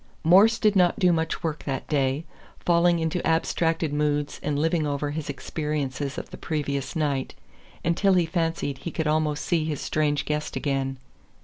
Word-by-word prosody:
Morse 200 Hz, +7 st, +6 dB
did 210 Hz, -2 st, +2 dB
not 180 Hz, -2 st, +4 dB
do 180 Hz, -4 st, +4 dB
much 160 Hz, 0 st, -1 dB
work 155 Hz, -2 st, -2 dB
that 135 Hz, -2 st, -3 dB
day, 140 Hz, +1 st, 0 dB, 0.3 s
falling 170 Hz, 0 st, +3 dB
into 165 Hz, +1 st, -1 dB
abstracted 165 Hz, -1 st, +1 dB
moods 145 Hz, -1 st, 0 dB
and 145 Hz, -1 st, -1 dB
living 160 Hz, 0 st, +1 dB
over 145 Hz, 0 st, -2 dB
his 150 Hz, 0 st, -4 dB
experiences 145 Hz, -1 st, -3 dB
of -, -, -6 dB
the -, -, -8 dB
previous 140 Hz, -4 st, -3 dB
night, 145 Hz, -4 st, -1 dB, 0.5 s
until 180 Hz, +4 st, +3 dB
he 175 Hz, -2 st, +3 dB
fancied 165 Hz, -5 st, -2 dB
he 170 Hz, -, -5 dB
could 160 Hz, -1 st, -3 dB
almost 150 Hz, -1 st, 0 dB
see 165 Hz, -3 st, +1 dB
his 155 Hz, -2 st, -3 dB
strange 150 Hz, -1 st, 0 dB
guest 150 Hz, 0 st, -2 dB
again. 135 Hz, -2 st, -1 dB
155 Hz, 170 wpm, -25 LUFS, 145-165 Hz, 0.5 s, Morse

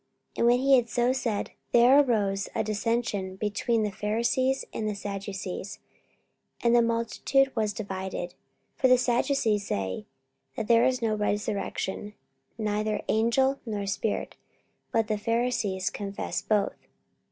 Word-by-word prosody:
44:023:007 -, -, -18 dB
And 235 Hz, -, +4 dB
when 245 Hz, +1 st, +5 dB
he 275 Hz, 0 st, +6 dB
had 235 Hz, -2 st, 0 dB
so 245 Hz, +2 st, +2 dB
said, 230 Hz, -6 st, -2 dB, 0.2 s
there 245 Hz, +4 st, +7 dB
arose 205 Hz, -7 st, +1 dB
a -, -, +1 dB
dissension 215 Hz, -3 st, -1 dB
between 215 Hz, +3 st, 0 dB
the 210 Hz, -, -1 dB
Pharisees 235 Hz, +6 st, 0 dB
and 215 Hz, -1 st, -2 dB
the 210 Hz, -, -3 dB
Sadducees: 195 Hz, -1 st, -5 dB, 0.9 s
and 235 Hz, 0 st, +4 dB
the 240 Hz, -, +6 dB
multitude 235 Hz, +4 st, +1 dB
was 215 Hz, -2 st, +1 dB
divided. 190 Hz, -4 st, -4 dB
44:023:008 -, -, -23 dB, 0.5 s
For 260 Hz, -, +6 dB
the 255 Hz, 0 st, +6 dB
Sadducees 240 Hz, -4 st, +1 dB
say 95 Hz, +1 st, -3 dB, 0.5 s
that 210 Hz, -, -3 dB
there 230 Hz, 0 st, +5 dB
is 255 Hz, -2 st, +1 dB
no 220 Hz, -1 st, +2 dB
resurrection, 205 Hz, -1 st, -2 dB, 0.4 s
neither 215 Hz, -1 st, -1 dB
angel, 265 Hz, +5 st, +2 dB
nor 210 Hz, -4 st, -3 dB
spirit: 200 Hz, +2 st, -2 dB, 0.5 s
but 225 Hz, -1 st, +1 dB
the 215 Hz, -1 st, -1 dB
Pharisees 230 Hz, -4 st, 0 dB
confess 200 Hz, -1 st, -4 dB
both. 210 Hz, -2 st, 0 dB
220 Hz, 140 wpm, -27 LUFS, 205-240 Hz, 0.9 s, there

